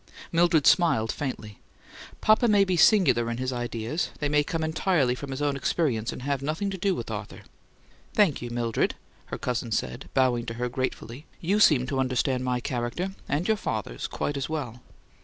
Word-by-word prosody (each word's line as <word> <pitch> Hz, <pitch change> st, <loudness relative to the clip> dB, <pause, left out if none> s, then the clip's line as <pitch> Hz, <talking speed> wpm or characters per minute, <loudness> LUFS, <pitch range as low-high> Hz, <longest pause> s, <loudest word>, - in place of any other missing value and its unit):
Mildred 165 Hz, -3 st, +3 dB
smiled 115 Hz, -11 st, +4 dB
faintly. 115 Hz, -7 st, -5 dB, 0.6 s
"Papa 215 Hz, +3 st, +4 dB
may 205 Hz, -2 st, +5 dB
be 185 Hz, -1 st, 0 dB
singular 165 Hz, -, +4 dB
in 115 Hz, -, -3 dB
his 130 Hz, +1 st, -2 dB
ideas; 120 Hz, +5 st, -3 dB
they 145 Hz, -, -1 dB
may 150 Hz, 0 st, +3 dB
come 160 Hz, +2 st, -3 dB
entirely 160 Hz, -4 st, +1 dB
from 140 Hz, +2 st, -7 dB
his 135 Hz, +2 st, -3 dB
own 145 Hz, -1 st, +1 dB
experience, 130 Hz, -4 st, 0 dB
and -, -, -8 dB
have 140 Hz, -1 st, -1 dB
nothing 160 Hz, +8 st, -2 dB
to 190 Hz, -, -4 dB
do 195 Hz, 0 st, +1 dB
with -, -, -5 dB
Arthur." -, -, -6 dB, 0.7 s
"Thank 200 Hz, -10 st, +3 dB
you, 120 Hz, -, -5 dB
Mildred," 120 Hz, -1 st, -1 dB, 0.3 s
her -, -, -5 dB
cousin 120 Hz, -2 st, -3 dB
said, 120 Hz, +3 st, -3 dB
bowing 125 Hz, -3 st, +2 dB
to 115 Hz, -, -4 dB
her 125 Hz, +1 st, -2 dB
gratefully. 130 Hz, +2 st, -4 dB
"You 195 Hz, +5 st, +1 dB
seem 145 Hz, -11 st, +5 dB
to 135 Hz, +1 st, -2 dB
understand 130 Hz, 0 st, 0 dB
my 125 Hz, -1 st, 0 dB
character 125 Hz, +10 st, -3 dB, 0.2 s
and 150 Hz, +5 st, 0 dB
your 220 Hz, -1 st, +2 dB
father's 105 Hz, -, -4 dB
quite 145 Hz, -, -3 dB
as 140 Hz, -, -3 dB
well!" 125 Hz, -7 st, -4 dB
135 Hz, 185 wpm, -26 LUFS, 120-165 Hz, 0.7 s, may